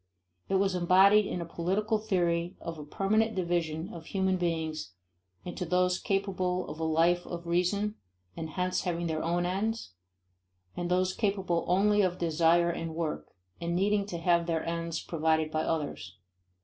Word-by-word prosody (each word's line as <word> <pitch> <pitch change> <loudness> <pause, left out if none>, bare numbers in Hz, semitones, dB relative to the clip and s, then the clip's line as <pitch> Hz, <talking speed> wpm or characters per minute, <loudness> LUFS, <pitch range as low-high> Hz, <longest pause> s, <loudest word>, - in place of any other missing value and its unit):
It 195 - +1
was 195 0 +2
embodied 190 +4 +5
in 180 - -3
a - - -4
political 195 +7 -1
theory 175 -4 0
of 165 -1 -6
a - - -6
permanent 215 +8 +1
division 170 -3 -1
of 165 -2 -9
human 190 -1 +1
beings 160 - -2 0.5
into 180 0 -4
those 180 +1 +1
capable 185 -2 -1
of 155 - -8
a - - -2
life 165 +2 +3
of 170 -1 -6
reason 180 +5 +1 0.4
and 160 -1 -5
hence 180 +2 -1
having 175 -2 -2
their 160 -1 -1
own 175 +2 0
ends, 200 - -2 0.8
and 175 0 -3
those 185 +1 +2
capable 195 -5 0
only 205 +3 +4
of 185 -2 +1
desire 170 +1 +3
and 165 -1 -5
work, 155 - -3 0.3
and 170 0 -1
needing 200 +2 +1
to 175 - -4
have 170 0 +2
their 165 -1 -1
ends 165 0 -2
provided 160 -1 0
by 155 - 0
others. 145 - -3
175 Hz, 160 wpm, -29 LUFS, 165-190 Hz, 0.8 s, embodied